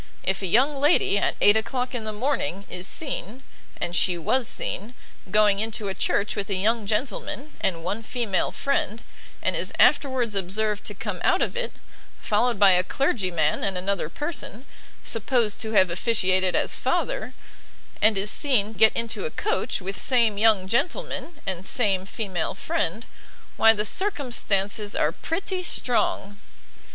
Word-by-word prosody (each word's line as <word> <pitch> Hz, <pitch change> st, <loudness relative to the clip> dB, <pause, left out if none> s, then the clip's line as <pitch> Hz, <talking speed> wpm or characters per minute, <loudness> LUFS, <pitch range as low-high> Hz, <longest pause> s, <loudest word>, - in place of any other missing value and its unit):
If 190 Hz, +1 st, -1 dB
a 190 Hz, -, -2 dB
young 265 Hz, -, +3 dB
lady 290 Hz, -8 st, +4 dB
at -, -, 0 dB
eight 205 Hz, -, +7 dB
o'clock 250 Hz, +4 st, -1 dB
in 235 Hz, -3 st, -4 dB
the 215 Hz, -, -3 dB
morning, 210 Hz, -, -2 dB
is 180 Hz, +1 st, -3 dB
seen, 265 Hz, -, -4 dB, 0.4 s
and 175 Hz, 0 st, -2 dB
she 180 Hz, -2 st, +2 dB
was 235 Hz, +9 st, 0 dB
seen, 225 Hz, +6 st, -3 dB, 0.3 s
going 210 Hz, 0 st, +3 dB
into 215 Hz, -2 st, -3 dB
a -, -, -2 dB
church 200 Hz, +1 st, -1 dB
with 200 Hz, 0 st, -4 dB
a 200 Hz, -, +1 dB
young 215 Hz, +3 st, 0 dB
gentleman, 255 Hz, +6 st, -3 dB
and 165 Hz, -3 st, -1 dB
one 205 Hz, +6 st, -3 dB
female 225 Hz, -4 st, -1 dB
friend; 230 Hz, -5 st, -1 dB, 0.4 s
and -, -, +1 dB
is -, -, -1 dB
afterwards 255 Hz, -5 st, +3 dB
observed 205 Hz, +2 st, -1 dB
to -, -, -4 dB
come -, -, -5 dB
out -, -, +3 dB
of -, -, -3 dB
it, -, -, -2 dB, 0.5 s
followed 235 Hz, +2 st, +1 dB
by 200 Hz, -1 st, +6 dB
a 180 Hz, 0 st, +4 dB
clergyman 185 Hz, -, 0 dB
and 195 Hz, -2 st, 0 dB
another 185 Hz, -3 st, -1 dB
person, 290 Hz, -, -5 dB, 0.4 s
supposed 225 Hz, -1 st, 0 dB
to 220 Hz, -1 st, -4 dB
have 185 Hz, -4 st, +4 dB
officiated 185 Hz, -1 st, +2 dB
as -, -, +1 dB
father, -, -, -2 dB, 0.7 s
and 215 Hz, -1 st, +4 dB
is 200 Hz, +2 st, +1 dB
seen 225 Hz, -7 st, +2 dB
get 220 Hz, 0 st, +5 dB
into 230 Hz, -, -2 dB
a -, -, -5 dB
coach 430 Hz, -, -2 dB
with 195 Hz, +2 st, -4 dB
same 235 Hz, -5 st, +3 dB
young 210 Hz, -4 st, +4 dB
gentleman, 305 Hz, -, -2 dB
and 185 Hz, -2 st, -3 dB
same 195 Hz, -4 st, +1 dB
female 195 Hz, -6 st, -3 dB
friend, 215 Hz, +9 st, -2 dB, 0.5 s
why 225 Hz, -, +7 dB
the 210 Hz, -1 st, -1 dB
circumstances 215 Hz, -, 0 dB
are 150 Hz, -, +2 dB
pretty 370 Hz, -, -3 dB
strong! 215 Hz, -, 0 dB
215 Hz, 160 wpm, -24 LUFS, 195-245 Hz, 0.7 s, eight